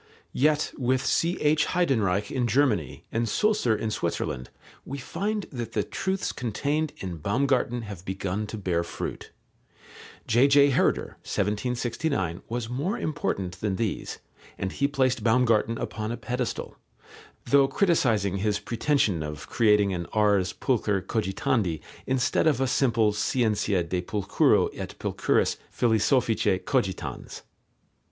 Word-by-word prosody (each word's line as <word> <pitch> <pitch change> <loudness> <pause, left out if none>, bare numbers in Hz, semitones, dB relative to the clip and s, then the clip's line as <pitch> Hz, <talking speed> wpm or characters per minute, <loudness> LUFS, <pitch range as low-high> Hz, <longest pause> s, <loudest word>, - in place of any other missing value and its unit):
Yet 150 +2 +2
with 130 +1 +1
C.H. 155 -3 +2
Heydenreich 110 - +1
in 125 -3 0
Germany 110 - +1
and 115 0 0
Sulzer 210 - +2
in 110 +1 -2
Switzerland 65 -10 -3 0.3
we 140 - -6
find 205 +9 -3
that 120 -4 -5
the 105 - +1
truths 190 - -2
contained 145 +6 -1
in 90 -3 -5
Baumgarten 120 - 0
have 100 -5 -8
begun 95 +2 -3
to 110 - -6
bear 90 -4 0
fruit. - - -6 1.0
J.J. 140 +4 +5
Herder 130 - +1
(1769) 105 - -1
was 120 -1 -3
more 145 - -2
important 95 - -3
than 105 -3 0
these, 110 -1 -3 0.4
and 95 - -3
he 140 - +1
placed 130 -5 +1
Baumgarten 115 -1 +3
upon 110 0 -4
a 120 - -3
pedestal, 125 -1 -4 0.7
though 140 +2 +5
criticizing 115 - +2
his 105 +1 0
pretension 115 - 0
of 75 -1 -6
creating 105 -4 +3
an 85 -2 -4
ars 100 -4 +3
pulchre 105 -5 0
cogitandi 95 -3 0 0.3
instead 130 +4 +2
of 145 -5 +3
a 135 - +2
simple 115 -5 +2
scientia 105 -4 +1
de 90 +2 -2
pulchro 100 +2 +2
et - - -7
pulchris - - +1
philosophice 115 -3 +2
cogitans. 115 -9 -2
115 Hz, 125 wpm, -26 LUFS, 100-135 Hz, 1.0 s, J.J